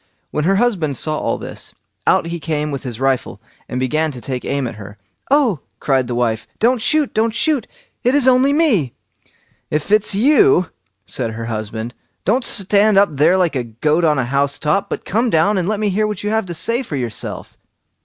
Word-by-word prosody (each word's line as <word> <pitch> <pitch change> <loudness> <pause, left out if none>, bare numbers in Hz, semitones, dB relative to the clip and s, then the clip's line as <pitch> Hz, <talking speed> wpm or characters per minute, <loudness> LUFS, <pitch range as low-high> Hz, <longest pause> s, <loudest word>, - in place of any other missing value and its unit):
When 150 - -1
her 195 +2 +3
husband 190 - 0
saw 155 +3 -1
all - - -1
this, - - -8 0.3
out - - +3
he 170 0 -4
came 150 -1 -2
with 140 -1 -4
his 120 -3 -6
rifle, 135 -6 -1 0.3
and 125 - -3
began 155 +5 0
to 125 - -8
take 125 +2 -5
aim 140 -1 -1
at 115 - -6
her. 100 0 -10 0.3
"Oh!" 265 - +3 0.2
cried 130 -3 0
his - - -2
wife, 115 -2 -1
"don't 240 +1 +2
shoot, 300 +3 +1
don't 220 +1 0
shoot! 280 -2 +1 0.4
it 250 +3 +2
is 280 -3 +4
only 260 +2 +5
me." 250 - +2 0.7
"If 150 +5 -2
it's 210 -1 +3
you", 290 - +4 0.3
said 120 -3 -2
her 115 +1 -5
husband, 110 +1 -5 0.3
"don't 245 +6 +2
stand 205 -1 +3
up 200 -1 +5
there 160 +7 +4
like 175 -5 +1
a 125 - -1
goat 150 +9 0
on 155 -3 +3
a 130 - 0
house 140 +2 0
top, 195 +7 0
but - - -5
come 230 +4 0
down 195 +4 +3
and 180 - -2
let 210 0 -1
me 210 -1 +1
hear 215 +3 +1
what 210 -2 -5
you 210 - -1
have 220 -3 0
to 175 - -5
say 230 +9 +1
for 225 - -6
yourself." 120 -5 -5
165 Hz, 205 wpm, -18 LUFS, 135-220 Hz, 0.7 s, only